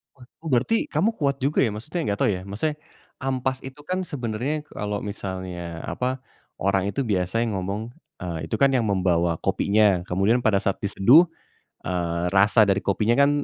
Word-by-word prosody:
Wah 130 -2 -15 0.2
oh - - -6
berarti, 225 - +2
kamu 220 - +1
kuat 140 -2 +1
juga 145 +3 +1
ya 110 - -1
maksudnya, 155 +11 -4
enggak 100 0 -1
tahu - - +4
ya, 90 -2 -3
maksudnya, 150 +10 -2 0.4
ampas 130 0 -1
itu 135 +2 -9
kan 185 +5 -3
sebenarnya 130 +1 -3
kalau 105 0 -4
misalnya 95 -4 -5
apa, 130 +1 -3 0.4
orang 95 0 +1
itu 140 - -2
biasanya 110 +2 0
ngomong, 100 +5 -4 0.3
eee, 85 -3 -4
itu - - -2
kan 140 - +6
yang 120 -3 +2
membawa 90 -4 +1
kopinya, 100 -3 +3
kemudian 95 +7 +2
pada 110 -4 +3
saat 100 - 0
diseduh, 115 - +6 0.6
eee, 85 -1 -1
rasa 105 +3 +5
dari 100 0 +2
kopinya 105 +3 +2
kan 140 0 +5
105 Hz, 170 wpm, -24 LUFS, 95-130 Hz, 0.6 s, kan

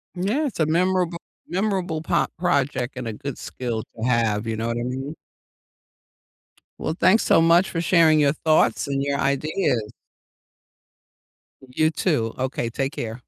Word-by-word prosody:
Yeah. 215 +12 0
It's 255 - -5
a 155 - +3
memorab 180 +2 +1 0.3
memorable 185 -4 -1
po 160 - +1
project 135 -7 0
and 125 -2 -4
a 110 - -3
good 140 +5 -6
skill 120 -3 -4
to 115 +2 -3
have, 115 -3 +1
you 110 - -1
know 115 +1 -3
what 115 0 -2
I 120 - -2
mean? 135 +5 -4 1.6
Well, 160 - -2
thanks 205 +5 +4
so - - +4
much 170 +3 +4
for 165 - -2
sharing 160 -3 +4
your 145 0 +3
thoughts 155 -2 +2
and 140 -1 -1
your 140 0 -1
ideas. 140 - 0 1.8
You 155 +5 +1
too, 130 -11 0
okay, 125 -2 -2
take 135 +4 -3
care. 115 +2 -5
140 Hz, 155 wpm, -23 LUFS, 120-170 Hz, 1.8 s, thanks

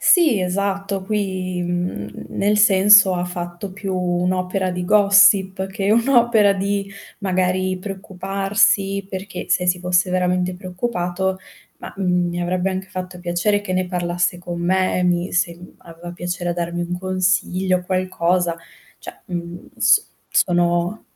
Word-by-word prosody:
Sì, 315 - +4
esatto, 195 +1 -2
qui, 190 -3 -2
mhmm, 175 - -4
nel 205 +1 0
senso 200 -1 +6
ha 175 0 -1
fatto 175 +2 -6
più 195 -1 -4
un'opera 180 +1 -1
di 180 0 -4
gossip, 200 -1 +4
che 195 0 -2
un'opera 235 -3 +4
di 200 0 -2 0.3
magari 185 -1 0
preoccuparsi, 195 +1 -1
perché 195 +1 -6
se 180 - +1
si 180 0 +2
fosse 180 +1 +1
veramente 180 0 0
preoccupato, 185 -1 -3 0.4
ma, - - -9
mhmm, 180 -2 0
mi 175 0 -4
avrebbe 180 +2 -1
anche 190 0 -5
fatto 185 -1 -7
piacere 175 +4 0
che 185 - -4
ne 185 0 0
parlasse 175 -1 -1
con 175 -1 -6
me 185 +2 +1
e - - 0
mi 175 0 0
se 170 -1 0
mhmm, 180 +1 -14
aveva 170 +1 -11
piacere 175 0 -3
darmi 170 0 -3
un 175 +1 -4
consiglio, 185 0 0
qualcosa, 180 -1 0 0.4
cioè, - - -11
mhmm, 175 -1 -6
s 420 - +4 0.2
sono 175 +3 +1
185 Hz, 140 wpm, -20 LUFS, 175-195 Hz, 0.4 s, senso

